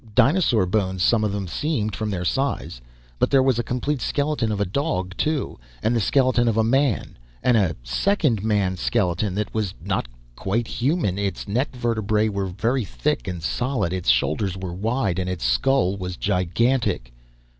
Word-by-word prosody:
Dinosaur 135 Hz, -, +4 dB
bones, 95 Hz, -1 st, 0 dB
some 115 Hz, +1 st, +3 dB
of 105 Hz, -, +1 dB
them 100 Hz, -1 st, -3 dB
seemed, 110 Hz, -, -1 dB
from 110 Hz, +1 st, -3 dB
their 90 Hz, -3 st, -2 dB
size. 135 Hz, -, -1 dB, 0.4 s
But -, -, +3 dB
there 135 Hz, -2 st, +5 dB
was 130 Hz, -3 st, +2 dB
a -, -, +1 dB
complete 125 Hz, +3 st, -2 dB
skeleton 145 Hz, -6 st, 0 dB
of 105 Hz, -, -2 dB
a 100 Hz, -, +2 dB
dog, 95 Hz, -, -2 dB
too, 150 Hz, -, -1 dB, 0.2 s
and 115 Hz, -, +2 dB
the -, -, +2 dB
skeleton 130 Hz, +1 st, +3 dB
of 115 Hz, -1 st, +1 dB
a 110 Hz, -, +4 dB
man, 130 Hz, -, +1 dB, 0.2 s
and 125 Hz, -, +4 dB
a 95 Hz, -7 st, +2 dB
second 125 Hz, -, +1 dB
man 100 Hz, -4 st, +1 dB
skeleton 95 Hz, -1 st, 0 dB
that 105 Hz, 0 st, -2 dB
was 105 Hz, -4 st, -2 dB
not -, -, -2 dB, 0.3 s
quite 110 Hz, -, -1 dB
human. 120 Hz, -, 0 dB
Its 100 Hz, -1 st, -3 dB
neck 125 Hz, +6 st, -1 dB
vertebrae 110 Hz, -3 st, +1 dB
were 100 Hz, -2 st, -2 dB
very 115 Hz, +7 st, 0 dB
thick -, -, -2 dB
and 90 Hz, -3 st, -4 dB
solid, 115 Hz, -3 st, -1 dB
its 90 Hz, -8 st, -1 dB
shoulders 80 Hz, -, +1 dB
were 95 Hz, -2 st, -5 dB
wide, 100 Hz, -1 st, -1 dB
and 90 Hz, 0 st, -2 dB
its 90 Hz, -8 st, -3 dB
skull 95 Hz, -, +2 dB
was 90 Hz, -2 st, -5 dB
gigantic. 100 Hz, -, 0 dB
105 Hz, 175 wpm, -23 LUFS, 90-125 Hz, 0.4 s, there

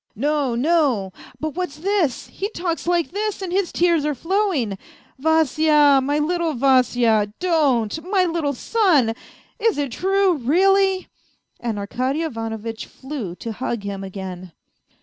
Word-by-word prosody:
" -, -, -45 dB
No, 285 Hz, 0 st, 0 dB
no... 255 Hz, -, +1 dB, 0.3 s
but 310 Hz, -1 st, -3 dB
what's 360 Hz, -5 st, -4 dB
this? 360 Hz, -5 st, 0 dB
He 400 Hz, -, -4 dB
talks 340 Hz, -1 st, -3 dB
like 345 Hz, -2 st, +1 dB
this 420 Hz, +2 st, -2 dB
and 365 Hz, -, -4 dB
his 380 Hz, 0 st, 0 dB
tears 340 Hz, -3 st, +2 dB
are 300 Hz, -1 st, -1 dB
flowing.... 330 Hz, -, -1 dB, 0.4 s
Vasya, 305 Hz, -2 st, +4 dB
my 285 Hz, +3 st, 0 dB
little 330 Hz, 0 st, 0 dB
Vasya, 245 Hz, -5 st, +3 dB
don't, 310 Hz, -, +1 dB
my 380 Hz, -2 st, +3 dB
little 330 Hz, -4 st, -1 dB
son! 310 Hz, -, +2 dB, 0.5 s
Is 455 Hz, -4 st, +1 dB
it 285 Hz, -3 st, -2 dB
true, 385 Hz, -, +2 dB
really? 380 Hz, +7 st, +2 dB, 0.3 s
" -, -, -46 dB
And 230 Hz, -3 st, -3 dB
Arkady 255 Hz, +9 st, -2 dB
Ivanovitch 225 Hz, -5 st, -5 dB
flew 260 Hz, -, -7 dB
to 230 Hz, -, -6 dB
hug 235 Hz, -1 st, -3 dB
him 200 Hz, -1 st, -5 dB
again. 185 Hz, -2 st, -7 dB
295 Hz, 145 wpm, -21 LUFS, 235-350 Hz, 0.5 s, Vasya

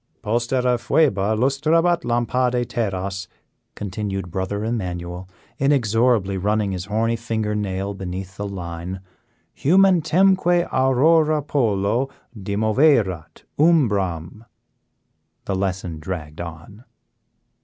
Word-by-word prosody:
"Postera 120 Hz, +2 st, +1 dB
Phoeba 110 Hz, -7 st, +2 dB
lustrabat 155 Hz, +7 st, +2 dB
lampade 120 Hz, +1 st, 0 dB
terras," 95 Hz, -4 st, -3 dB, 0.5 s
continued 95 Hz, -2 st, -4 dB
Brother 95 Hz, +4 st, -3 dB
Emmanuel, 90 Hz, -5 st, -4 dB, 0.3 s
inexorably 115 Hz, -6 st, +2 dB
running 105 Hz, +1 st, 0 dB
his 90 Hz, -1 st, -4 dB
horny 115 Hz, +3 st, 0 dB
finger 110 Hz, -2 st, -2 dB
nail 100 Hz, -1 st, -2 dB
beneath 95 Hz, 0 st, -6 dB
the 100 Hz, +1 st, -4 dB
line, 90 Hz, -1 st, -6 dB, 0.5 s
"humentemque 180 Hz, +1 st, +3 dB
Aurora 150 Hz, +4 st, +3 dB
polo 115 Hz, -2 st, 0 dB, 0.3 s
dimoverat 105 Hz, -, +1 dB, 0.2 s
umbram 105 Hz, -, +1 dB, 0.5 s
" -, -, -49 dB
the -, -, -2 dB
lesson 95 Hz, -4 st, -3 dB
dragged 75 Hz, -2 st, -6 dB
along. 85 Hz, +6 st, -9 dB
105 Hz, 90 wpm, -22 LUFS, 95-130 Hz, 0.5 s, humentemque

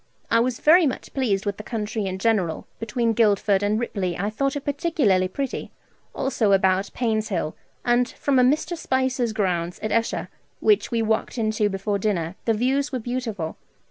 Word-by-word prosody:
I 230 Hz, -, +5 dB
was 240 Hz, 0 st, 0 dB
very 330 Hz, +1 st, +6 dB
much 260 Hz, -, -5 dB
pleased 215 Hz, -7 st, 0 dB
with 205 Hz, -1 st, -2 dB
the 215 Hz, -, -7 dB
country 210 Hz, -2 st, -3 dB
in 185 Hz, 0 st, -3 dB
general. 190 Hz, -6 st, 0 dB
Between 230 Hz, +1 st, 0 dB
Guildford 205 Hz, -3 st, +3 dB
and 205 Hz, +2 st, +1 dB
Ripley 190 Hz, -7 st, -2 dB
I 205 Hz, +3 st, -1 dB
thought 275 Hz, +5 st, -1 dB
it 285 Hz, -, -5 dB
particularly 280 Hz, -, +2 dB
pretty, 270 Hz, +8 st, -4 dB, 0.5 s
also 220 Hz, -6 st, +1 dB
about 190 Hz, 0 st, +3 dB
Painshill; 215 Hz, -9 st, -1 dB, 0.3 s
and 240 Hz, +1 st, +3 dB
from 275 Hz, -2 st, +1 dB
a -, -, +6 dB
Mr. 310 Hz, +6 st, +2 dB
Spicer's 260 Hz, -5 st, 0 dB
grounds 180 Hz, -4 st, -1 dB
at 215 Hz, -, -1 dB
Esher, 230 Hz, 0 st, 0 dB, 0.3 s
which 420 Hz, -2 st, +3 dB
we 230 Hz, -2 st, 0 dB
walked 220 Hz, +3 st, -1 dB
into 215 Hz, -2 st, +1 dB
before 200 Hz, +1 st, -2 dB
dinner, 185 Hz, -4 st, -1 dB
the 225 Hz, -, +3 dB
views 270 Hz, +6 st, +1 dB
were 260 Hz, -, -1 dB
beautiful. 230 Hz, -8 st, -4 dB
220 Hz, 175 wpm, -24 LUFS, 200-255 Hz, 0.5 s, very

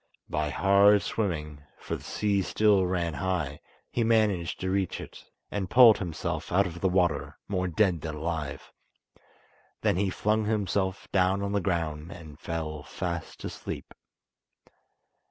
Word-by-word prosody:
By 75 Hz, 0 st, 0 dB
hard 100 Hz, +4 st, +5 dB
swimming, 75 Hz, -8 st, -2 dB, 0.2 s
for -, -, -4 dB
the -, -, -9 dB
sea 100 Hz, -2 st, 0 dB
still 100 Hz, -1 st, +3 dB
ran 85 Hz, -3 st, -1 dB
high, 75 Hz, -2 st, -2 dB, 0.3 s
he 120 Hz, -, +1 dB
managed 105 Hz, -7 st, +2 dB
to 95 Hz, 0 st, -1 dB
reach 95 Hz, -2 st, 0 dB
it, -, -, -10 dB, 0.3 s
and 95 Hz, -3 st, -2 dB
pulled 120 Hz, -2 st, +8 dB
himself 85 Hz, -2 st, -4 dB
out 100 Hz, +3 st, +4 dB
of 85 Hz, -1 st, -6 dB
the 95 Hz, -, +3 dB
water, 90 Hz, -6 st, +1 dB
more 95 Hz, -2 st, -1 dB
dead 90 Hz, -1 st, +2 dB
than 80 Hz, -1 st, -4 dB
alive. 80 Hz, -1 st, -4 dB, 1.1 s
Then -, -, +2 dB
he 100 Hz, 0 st, +1 dB
flung 105 Hz, +3 st, 0 dB
himself 100 Hz, -2 st, -1 dB
down 95 Hz, +1 st, +2 dB
on 100 Hz, -, -2 dB
the 100 Hz, 0 st, +1 dB
ground 80 Hz, -3 st, -2 dB
and 80 Hz, -3 st, -11 dB
fell 80 Hz, -3 st, -4 dB
fast 85 Hz, +3 st, -5 dB
asleep. -, -, -6 dB
90 Hz, 145 wpm, -28 LUFS, 80-100 Hz, 1.1 s, pulled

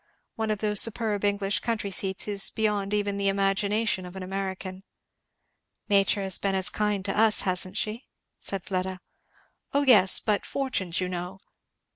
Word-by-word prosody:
One 220 Hz, -1 st, -2 dB
of 215 Hz, -, 0 dB
those 210 Hz, 0 st, +3 dB
superb 220 Hz, -3 st, +1 dB
English 200 Hz, -1 st, 0 dB
country 220 Hz, -4 st, -2 dB
seats 190 Hz, +1 st, -2 dB
is 200 Hz, -2 st, +1 dB
beyond 210 Hz, -2 st, -1 dB
even 205 Hz, -1 st, -1 dB
the 200 Hz, 0 st, 0 dB
imagination 200 Hz, +1 st, +1 dB
of 180 Hz, +1 st, -10 dB
an 190 Hz, -, -6 dB
American." 190 Hz, 0 st, -5 dB, 1.1 s
"Nature 200 Hz, 0 st, +3 dB
has 190 Hz, -1 st, +2 dB
been 195 Hz, -1 st, 0 dB
as 190 Hz, -1 st, +1 dB
kind 210 Hz, -2 st, -1 dB
to 195 Hz, -, -2 dB
us, 220 Hz, 0 st, +4 dB
hasn't 185 Hz, +1 st, -1 dB
she?" 220 Hz, +4 st, -3 dB, 0.3 s
said 195 Hz, -2 st, -4 dB
Fleda. 185 Hz, 0 st, -3 dB, 0.7 s
"O 285 Hz, +1 st, +2 dB
yes, 205 Hz, -9 st, +6 dB
but 210 Hz, -2 st, 0 dB
such -, -, -13 dB
fortunes 195 Hz, -11 st, -1 dB
you 185 Hz, -, -1 dB
know. 180 Hz, +1 st, -5 dB
200 Hz, 165 wpm, -26 LUFS, 190-210 Hz, 1.1 s, yes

